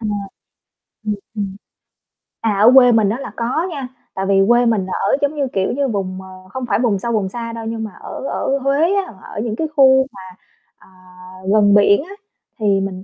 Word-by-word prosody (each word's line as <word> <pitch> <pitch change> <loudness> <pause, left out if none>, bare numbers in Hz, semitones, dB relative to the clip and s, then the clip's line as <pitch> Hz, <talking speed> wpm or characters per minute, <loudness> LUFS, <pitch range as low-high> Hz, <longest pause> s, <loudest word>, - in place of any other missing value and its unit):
Ờ. 220 - -4 1.0
Ừm, 210 - 0 0.2
ừm. 200 -2 -4 0.9
À, 210 -3 0
ở 230 +4 +8
quê 250 -2 +8
mình 220 -3 +3
á, 235 +5 -2
là 235 - -7
có 255 +10 -1
nha, 275 -4 -5 0.3
tại 190 - -2
vì 195 0 +3
quê 240 +1 +4
mình 220 -5 +1
là 190 - -5
ở - - +3
giống 285 +2 0
như, 280 -2 -1
kiểu 190 -1 0
như, 275 +1 0
vùng, 190 -4 -3
ờ, 185 0 -13
không 260 +4 -5
phải - - +2
vùng 225 -6 +1
sâu 235 +3 -3
vùng 210 -4 0
xa 230 +2 -6
đâu 230 -1 -6
nhưng 225 0 -3
mà 215 - -6
ở - - -7
ở 275 - -1
Huế 280 +7 +2
á, 385 - -2
ở - - -8
những 220 -2 -3
cái 315 - -2
khu 265 -2 +5
mà, 195 - -12 0.6
ờ, - - -21 0.7
gần 205 -1 +5
biển 205 +4 +5
á, 390 +5 -11 0.4
thì 215 - -3 0.2
mình 190 -1 -5
225 Hz, 215 wpm, -18 LUFS, 200-265 Hz, 1.0 s, ở